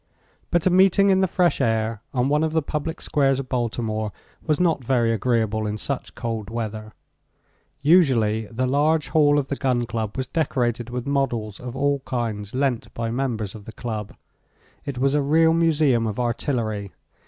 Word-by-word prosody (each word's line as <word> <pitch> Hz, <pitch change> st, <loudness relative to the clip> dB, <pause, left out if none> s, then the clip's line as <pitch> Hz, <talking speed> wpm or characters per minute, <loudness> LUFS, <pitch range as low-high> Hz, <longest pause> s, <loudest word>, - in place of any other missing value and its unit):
But 175 Hz, -2 st, +1 dB
a 185 Hz, -, +4 dB
meeting 195 Hz, +2 st, +5 dB
in 190 Hz, 0 st, +3 dB
the 190 Hz, -, +3 dB
fresh 175 Hz, -5 st, +1 dB
air 110 Hz, -3 st, 0 dB
on 130 Hz, -2 st, +1 dB
one 150 Hz, +2 st, +2 dB
of 160 Hz, -1 st, -1 dB
the 160 Hz, -1 st, +1 dB
public 150 Hz, +3 st, -4 dB
squares 135 Hz, -3 st, +2 dB
of 135 Hz, -, -6 dB
Baltimore 110 Hz, -3 st, -2 dB, 0.3 s
was 155 Hz, -2 st, 0 dB
not 165 Hz, -7 st, +2 dB
very 120 Hz, -2 st, +2 dB
agreeable 110 Hz, -1 st, 0 dB
in 105 Hz, 0 st, -3 dB
such 140 Hz, +4 st, -4 dB
cold 115 Hz, -3 st, -4 dB
weather. 110 Hz, -1 st, -5 dB, 0.9 s
Usually 120 Hz, -, +3 dB
the 125 Hz, +4 st, -2 dB
large 145 Hz, +2 st, +2 dB
hall 145 Hz, -2 st, +4 dB
of 140 Hz, -2 st, -1 dB
the 140 Hz, -, -1 dB
Gun 125 Hz, -3 st, 0 dB
Club 110 Hz, 0 st, -4 dB
was 130 Hz, -, -1 dB
decorated 125 Hz, -5 st, -1 dB
with 125 Hz, 0 st, -4 dB
models 120 Hz, -7 st, -1 dB
of 125 Hz, 0 st, -7 dB
all 140 Hz, +1 st, +1 dB
kinds 115 Hz, -5 st, -4 dB
lent 130 Hz, -3 st, -1 dB
by 115 Hz, -1 st, -2 dB
members 115 Hz, -5 st, -2 dB
of 105 Hz, -2 st, -11 dB
the 110 Hz, -, -9 dB
Club. 110 Hz, -4 st, -5 dB, 0.7 s
It 140 Hz, -3 st, -4 dB
was 135 Hz, +2 st, +2 dB
a 150 Hz, -, +2 dB
real 160 Hz, +3 st, +4 dB
museum 150 Hz, -8 st, +2 dB
of 110 Hz, +2 st, -4 dB
artillery. 115 Hz, -4 st, -2 dB
125 Hz, 175 wpm, -23 LUFS, 110-145 Hz, 0.9 s, meeting